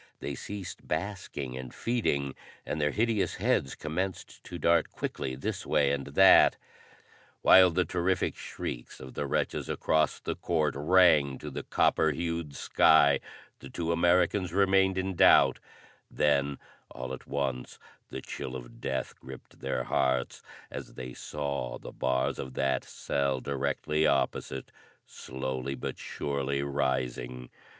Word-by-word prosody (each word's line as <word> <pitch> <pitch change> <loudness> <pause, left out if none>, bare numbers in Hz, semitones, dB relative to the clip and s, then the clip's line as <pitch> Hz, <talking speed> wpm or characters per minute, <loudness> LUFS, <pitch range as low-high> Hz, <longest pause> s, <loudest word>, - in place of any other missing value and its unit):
They 70 - -4
ceased 95 +6 -7
basking 90 -10 -4
and 65 -1 -7
feeding, 70 - -1 0.3
and 75 - -3
their 75 - +3
hideous 110 +2 0
heads 65 - 0
commenced 90 +4 -4
to 90 - -7
dart 85 0 +3
quickly 65 -1 -4
this 65 - -4
way 70 -1 +2
and 70 -1 -2
that. 95 +8 +6 0.9
While 95 -1 +8
the 90 +1 +1
terrific 90 +1 0
shrieks - - -6
of 65 -1 -10
the - - -3
wretches - - -1
across 80 0 +1
the - - -4
court 80 -4 0
rang 75 -3 +4
to - - -7
the - - -4
copper 80 - +2
hued 85 -1 -3
sky, 70 -3 +4 0.4
the 65 - -10
two 85 +5 -2
Americans 90 +2 +2
remained 95 -1 +3
in 95 0 -1
doubt; 85 - +5 0.5
then 70 -1 +1 0.3
all 65 0 -6
at - - -9
once 65 -3 -3 0.3
the - - -6
chill 65 - -6
of - - -10
death 65 -1 -2
gripped 65 0 -12
their 60 - -2
hearts, 65 -2 0 0.3
as - - -8
they 65 -1 -7
saw 70 -3 -4
the - - -10
bars 65 0 -1
of 65 -1 -6
that 65 -1 0
cell 70 -2 -1
directly 75 +3 0
opposite 65 -1 -1 0.3
slowly 65 +1 -5
but 65 - -5
surely 70 0 -2
rising! 65 -3 -2
70 Hz, 140 wpm, -29 LUFS, 65-85 Hz, 0.9 s, While